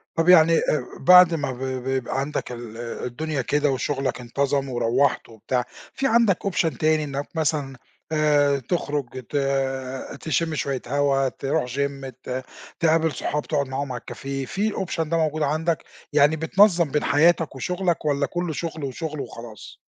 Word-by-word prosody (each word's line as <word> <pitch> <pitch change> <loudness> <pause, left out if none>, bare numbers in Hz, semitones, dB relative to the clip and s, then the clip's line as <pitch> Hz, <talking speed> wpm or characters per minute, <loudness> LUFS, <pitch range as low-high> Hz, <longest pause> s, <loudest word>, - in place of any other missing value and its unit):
طَب 165 +2 +2
يعني 165 -2 +7
آآ، 150 - 0
بعد 180 -1 +8
ما 145 -4 -1
ب 125 - -8
ب 130 -1 -3
بيبقى 130 0 -1
عندك 140 -2 -3
ال 120 -2 -8
الدنيا 125 +5 -4
كده 145 +2 +1
وشغلك 135 -1 -2
انتظَم 135 +2 -1
وروِّحت 125 +2 +1
وبتاع، 125 +3 -2 0.3
في 270 - 0
عندك 225 -6 +4
option 165 -8 0
تاني 155 0 +2
إنَّك 140 0 -4
مثلًا 145 -4 -1 0.4
آآ، 145 -2 +3
تخرُج 140 -2 -3
ت - - -7 0.9
تشُمّ 160 0 0
شويَّة 140 -3 -2
هوا، 140 -2 +2
ترُوح 140 +1 -1
gym 140 -1 -2
ت 130 +1 -4 0.4
تقابِل 160 -1 +3
صحاب، 145 +3 -2
تقعد 140 -3 0
معاهم 135 0 -3
على 125 -1 -5
الcafé، 135 -1 -5
في 205 +3 0
الoption 175 -3 -2
ده 165 +1 0
موجود 155 -1 0
عندك 155 +3 0 0.3
يعني؟ 150 +1 +5
بتنظِّم 170 -1 +3
بين 150 - 0
حياتك 160 0 +3
وشغلك، 175 +3 -1
والّا 140 -1 +1
كلُّه 175 0 -3
شغل 160 -1 -5
وشغل 150 +2 -4
وخلاص؟ 115 -3 -10
145 Hz, 155 wpm, -24 LUFS, 135-160 Hz, 0.9 s, بعد